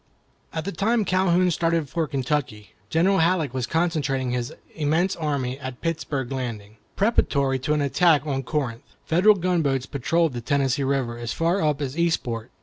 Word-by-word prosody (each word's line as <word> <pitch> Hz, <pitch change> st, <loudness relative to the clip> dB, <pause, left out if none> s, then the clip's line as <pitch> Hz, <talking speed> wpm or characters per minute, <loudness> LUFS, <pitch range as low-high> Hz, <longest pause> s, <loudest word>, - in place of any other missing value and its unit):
At 160 Hz, -1 st, -4 dB
the 200 Hz, -, -2 dB
time 220 Hz, +2 st, +1 dB
Calhoun 185 Hz, -1 st, +3 dB
started 165 Hz, -2 st, 0 dB
for 165 Hz, +2 st, -1 dB
Kentucky, 135 Hz, -7 st, -2 dB, 0.2 s
General 190 Hz, +4 st, +3 dB
Halleck 165 Hz, -5 st, +2 dB
was 130 Hz, -2 st, -2 dB
concentrating 145 Hz, -5 st, 0 dB
his 125 Hz, -1 st, -2 dB, 0.2 s
immense 160 Hz, +4 st, +1 dB
army 140 Hz, -5 st, -2 dB
at 130 Hz, -2 st, -7 dB
Pittsburg 150 Hz, -6 st, -3 dB
Landing, 110 Hz, -5 st, -5 dB, 0.2 s
preparatory 140 Hz, -, +2 dB
to 145 Hz, +4 st, 0 dB
an 150 Hz, -, 0 dB
attack 155 Hz, +1 st, +3 dB
on 135 Hz, -3 st, -1 dB
Corinth. 120 Hz, -6 st, -4 dB
Federal 185 Hz, +6 st, +5 dB
gunboats 165 Hz, -8 st, 0 dB
patrolled 160 Hz, +3 st, 0 dB
the 120 Hz, -, -4 dB
Tennessee 140 Hz, +2 st, +1 dB
River 130 Hz, -3 st, -1 dB
as 120 Hz, -1 st, -3 dB
far 170 Hz, +4 st, +1 dB
up 150 Hz, -1 st, +1 dB
as 135 Hz, 0 st, -4 dB
Eastport. 130 Hz, -9 st, -1 dB
145 Hz, 160 wpm, -24 LUFS, 130-170 Hz, 0.2 s, Federal